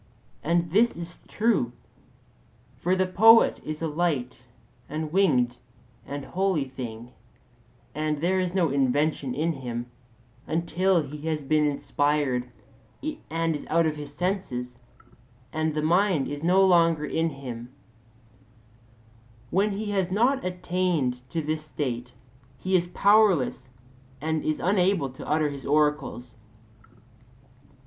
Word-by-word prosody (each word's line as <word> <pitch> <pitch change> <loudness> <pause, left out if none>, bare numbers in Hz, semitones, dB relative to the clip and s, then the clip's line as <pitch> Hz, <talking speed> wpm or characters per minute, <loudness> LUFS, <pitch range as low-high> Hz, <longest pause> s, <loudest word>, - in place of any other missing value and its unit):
And 170 +1 0
this 225 +4 +3
is 170 +1 -8
true. 210 - +1 1.1
For 180 +2 +1
the 185 0 +2
poet 225 +5 +6
is 155 +1 -5
a - - +1
light 150 -7 -1 0.5
and 155 +1 -4
winged 130 -11 +3 0.5
and 145 0 -5
holy 185 -6 0
thing, 120 -3 -8 0.8
and 155 -1 -1
there 185 +4 +1
is 180 0 -2
no 175 -4 +3
invention 140 0 +1
in 160 +4 0
him 120 -3 -6 0.6
until 170 +2 +1
he 150 +2 -7
has 155 -2 -1
been 150 +2 +2
inspired 145 -3 0 0.8
and 165 0 0
is 145 - -7
out 165 +1 +3
of 155 -1 0
his 145 -1 -8
senses, 145 -8 -3 0.7
and 155 -1 -1
the 150 - -1
mind 175 -2 +2
is 145 0 -5
no 185 +3 +5
longer 165 -4 +4
in 165 +2 0
him: 125 -4 -8 1.8
when 200 +2 +2
he 205 +1 -3
has 190 -3 0
not 250 +7 +2
attained 180 -7 -1
to 165 -2 -2
this 155 +1 -2
state, 125 -5 -4 0.5
he 185 +7 0
is 175 -1 +2
powerless 200 - +3 0.5
and 160 +2 -1
is 155 - -1
unable 185 -6 +2
to 130 - -10
utter 155 0 +2
his 140 -1 -8
oracles. 150 -5 0
155 Hz, 125 wpm, -26 LUFS, 140-180 Hz, 1.8 s, poet